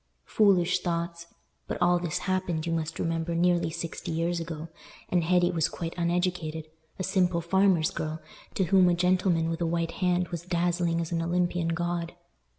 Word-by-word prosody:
Foolish 185 -4 +3
thoughts! 170 -1 -3 0.4
But - - -4
all 175 -1 +3
this 175 -3 -2
happened, 185 -4 -1
you 165 - -1
must 165 0 -2
remember, 165 0 -1
nearly 175 -1 +2
sixty 165 0 -5
years 170 +1 0
ago, 165 -1 -6 0.4
and 175 -2 +2
Hetty 175 +1 +3
was 165 -3 +1
quite 165 -1 -5
uneducated—a 165 -2 -3
simple 180 -2 +1
farmer's 180 -1 +2
girl, 155 +1 -4 0.4
to 195 - +2
whom 185 0 +5
a 175 - +3
gentleman 180 -2 +2
with 165 +1 -3
a 170 - +1
white 165 0 -1
hand 180 -1 +1
was 170 -2 -4
dazzling 175 -1 0
as 165 - -5
an 165 -1 0
Olympian 175 0 0
god. 170 0 -2
170 Hz, 165 wpm, -28 LUFS, 165-180 Hz, 0.4 s, whom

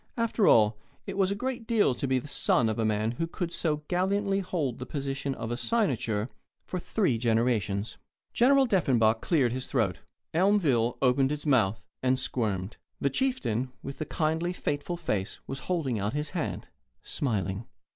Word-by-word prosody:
After 230 -3 +2
all, 105 -1 +5 0.3
it - - -5
was 195 -1 +2
a 200 - -1
great 250 0 -4
deal 220 - +3
to 135 - -3
be 130 0 +2
a 130 - -4
son 125 -4 +2
of 110 - -2
a 110 - +2
man 110 +1 +1
who 165 - 0
could 170 0 -4
so 150 -2 0
gallantly 195 +2 +1
hold 165 -10 -2
the 125 - -5
position 140 -1 -3
of 115 - -5
a - - 0
cynosure 120 - 0 0.4
for 185 - -3
three 170 - 0
generations. 110 -3 0 0.4
General 270 +3 +5
Deffenbaugh 130 - +3
cleared 140 -9 +2
his 130 +1 -3
throat. 110 - 0 0.3
Elmville 160 - +3
opened 130 +1 +3
its 150 0 -4
mouth, 110 -8 +2 0.2
and 130 0 +2
squirmed. 105 -7 -1 0.2
The 140 - +1
chieftain 130 - -1
with 135 - -7
the 155 - -2
kindly, 160 +3 -1
fateful 160 +1 -3
face 105 - -2
was 135 - -5
holding 145 - 0
out 100 +3 -1
his 150 +1 -3
hand, 175 -4 -3 0.4
smiling. 100 -5 -2
135 Hz, 170 wpm, -28 LUFS, 115-175 Hz, 0.4 s, all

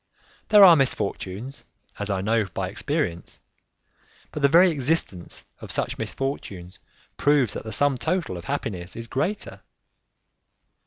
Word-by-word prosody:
There 210 -2 +8
are 175 -3 +10
misfortunes, 120 -2 -2 0.4
as 105 0 -3
I 95 -2 -1
know 110 +2 +1
by 95 0 -4
experience; 105 - -3 0.9
but 150 - -5
the 140 - +6
very 175 +5 +6
existence 135 - -2
of - - -9
such - - -3
misfortunes 95 -10 -5 0.4
proves 140 -7 +2
that - - -6
the 110 - -6
sum 135 +3 +1
total 165 - -1
of 85 0 -8
happiness 95 -10 -4
is 115 0 -6
greater. 185 - -3
125 Hz, 135 wpm, -24 LUFS, 95-145 Hz, 0.9 s, are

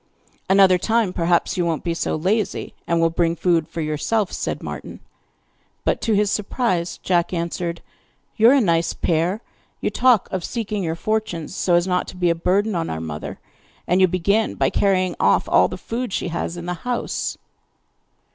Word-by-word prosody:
'Another 190 -1 +6
time 225 -1 +1
perhaps 175 +2 +1
you 180 - +2
won't 165 -2 -1
be 170 - -1
so 165 - -1
lazy, 195 +7 -1
and 170 0 +1
will 165 0 +3
bring 165 0 +1
food 165 -1 +1
for 165 - -5
yourself,' 160 +7 -1
said - - -3
Martin, - - -7 0.9
but - - +1
to 225 - +1
his 205 0 +2
surprise 195 -5 -1
Jack 175 -2 +1
answered: 170 0 -3 0.5
'You 225 +1 +6
are - - +6
a 280 - +4
nice 170 -5 +1
pair! 175 +6 0 0.4
You - - -1
talk 245 -5 +3
of 185 -2 -2
seeking 215 -2 -3
your 165 -2 -2
fortunes 190 -4 -2
so 175 - +2
as 175 0 +3
not 180 -1 0
to 185 - -9
be 175 -1 +2
a - - +3
burden 195 +6 +1
on 165 -2 -2
our 80 - -3
mother, 80 -2 -6 0.5
and 180 +2 +2
you 185 - +7
begin 200 +5 +1
by - - +1
carrying 185 -2 +1
off - - +3
all - - +5
the - - -6
food 240 0 -4
she 180 - -2
has 170 +1 -3
in 170 - -6
the 180 - -2
house! 245 -1 -2
180 Hz, 185 wpm, -22 LUFS, 170-210 Hz, 0.9 s, you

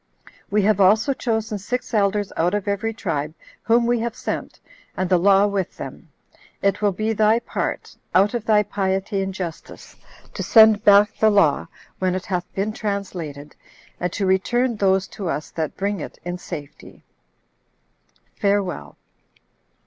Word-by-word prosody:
We 210 0 +2
have 205 -1 +3
also 215 +8 +4
chosen 220 -4 -2
six 245 +6 -4
elders 205 -1 +1
out 175 +4 +1
of 205 -1 -3
every 200 +2 -1
tribe, 155 -8 -3 0.3
whom 235 +1 +3
we 240 0 +1
have 230 0 -3
sent, - - -5 0.4
and 185 - 0
the 180 -1 +3
law 195 +2 +5
with 200 -3 -2
them. - - -9 0.5
It 200 +1 0
will 205 -1 +3
be 215 +4 -1
thy 215 +1 +3
part, 235 - -4 0.2
out 200 +4 +4
of 240 -3 -2
thy 210 -1 +4
piety 195 0 -1
and 195 0 -2
justice, 180 -4 -8 0.4
to - - -5
send 220 -2 +6
back 205 -1 +5
the 220 - +5
law, 200 -9 +3 0.3
when 185 -1 0
it 185 - -4
hath 180 -2 -3
been 205 +2 -1
translated, 180 -9 -5 0.4
and 180 -1 -2
to 200 - -1
return 235 +6 +1
those 190 -1 +2
to 190 -5 -5
us 150 +1 -4
that 160 -2 -4
bring 200 0 -1
it - - -8
in 175 0 -4
safety. 150 -6 -9 1.4
Farewell." 200 - -1
200 Hz, 155 wpm, -22 LUFS, 185-215 Hz, 1.4 s, send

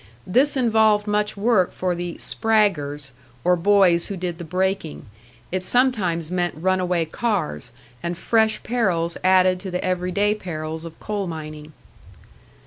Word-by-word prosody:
This 270 +9 +2
involved 220 -4 +3
much 210 0 -1
work 205 -3 +2
for 185 -1 -2
the 175 0 -4
"spraggers," 160 -11 0 0.3
or 180 - +4
boys 180 -2 +3
who 200 - -5
did 175 -1 -4
the - - -5
braking; 185 -2 -2 0.5
it 185 0 -2
sometimes 185 -9 +1
meant 175 -1 -1
run 185 +3 +1
away 180 -2 0
cars, 180 - -2 0.3
and 170 0 -3
fresh 220 +2 +1
perils 185 -8 0
added 185 0 +4
to 190 +1 -6
the 180 0 -3
everyday 185 +3 +1
perils 160 -5 -5
of 165 -1 -10
coal 205 -2 -3
mining. 155 -2 -7
185 Hz, 140 wpm, -22 LUFS, 170-210 Hz, 0.5 s, or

